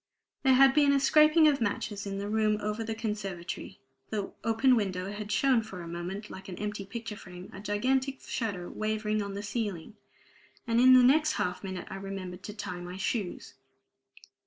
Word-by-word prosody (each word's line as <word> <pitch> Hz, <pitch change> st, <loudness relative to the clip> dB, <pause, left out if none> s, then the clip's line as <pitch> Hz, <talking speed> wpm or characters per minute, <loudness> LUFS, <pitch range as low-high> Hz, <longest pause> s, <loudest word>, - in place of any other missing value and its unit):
There 265 Hz, -1 st, +5 dB
had 270 Hz, +1 st, +7 dB
been 290 Hz, -1 st, +5 dB
a 280 Hz, -, +4 dB
scraping 305 Hz, +3 st, +6 dB
of 285 Hz, -3 st, +2 dB
matches 205 Hz, -1 st, -2 dB
in 195 Hz, 0 st, -3 dB
the 200 Hz, +1 st, -3 dB
room 215 Hz, 0 st, +2 dB
over 210 Hz, +2 st, -2 dB
the 225 Hz, 0 st, -3 dB
conservatory; 200 Hz, -6 st, -5 dB, 0.3 s
the 205 Hz, -3 st, -3 dB
open 230 Hz, +3 st, +4 dB
window 190 Hz, -3 st, -1 dB
had 205 Hz, 0 st, -6 dB
shown 260 Hz, -2 st, +3 dB
for 195 Hz, -5 st, -8 dB
a -, -, -8 dB
moment, 180 Hz, +5 st, -5 dB
like 190 Hz, +1 st, -9 dB
an 180 Hz, -, -6 dB
empty 210 Hz, -1 st, -4 dB
picture 225 Hz, 0 st, -6 dB
frame, 180 Hz, -2 st, -11 dB
a 190 Hz, -, -8 dB
gigantic 260 Hz, +7 st, 0 dB
shadow 195 Hz, -7 st, -3 dB
wavering 215 Hz, 0 st, -1 dB
on 200 Hz, -1 st, -5 dB
the 200 Hz, -, -5 dB
ceiling; 205 Hz, -3 st, -4 dB, 0.7 s
and 230 Hz, -1 st, +2 dB
in 255 Hz, 0 st, +8 dB
the 255 Hz, -, +7 dB
next 305 Hz, +5 st, +4 dB
half 180 Hz, +2 st, -2 dB
minute 190 Hz, -2 st, -5 dB
I 195 Hz, -, -5 dB
remembered 195 Hz, -2 st, -6 dB
to 210 Hz, -, -6 dB
tie 185 Hz, -4 st, -5 dB
my 180 Hz, +1 st, -7 dB
shoes. 195 Hz, -1 st, -3 dB
210 Hz, 185 wpm, -29 LUFS, 195-235 Hz, 0.7 s, in